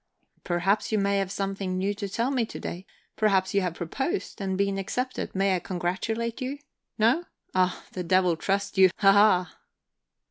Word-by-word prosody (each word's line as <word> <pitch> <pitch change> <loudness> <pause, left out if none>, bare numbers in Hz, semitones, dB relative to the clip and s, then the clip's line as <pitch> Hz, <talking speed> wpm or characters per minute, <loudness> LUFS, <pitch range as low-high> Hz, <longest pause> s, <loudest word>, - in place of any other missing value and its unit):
"Perhaps 190 +5 0
you 215 - +2
may 200 0 +2
have 195 -1 -2
something 195 -2 -2
new 195 +2 0
to 200 -1 -5
tell 235 +6 0
me 255 -4 +1
to - - -8
day. 180 +2 -6 0.3
Perhaps 195 -3 +2
you 200 - +3
have 180 -2 -2
proposed, 265 - -3
and 190 -1 -1
been 200 0 0
accepted. 250 +6 -3
May 195 0 +2
I - - 0
congratulate 210 +8 -3
you? 260 +3 -3 0.4
No? 240 +11 +3 0.3
Ah, 185 -1 +1
the 185 - -4
devil 180 0 +3
trust 200 +3 -1
you 190 -1 +8
haha!" 195 -2 +5
195 Hz, 170 wpm, -27 LUFS, 185-215 Hz, 0.4 s, you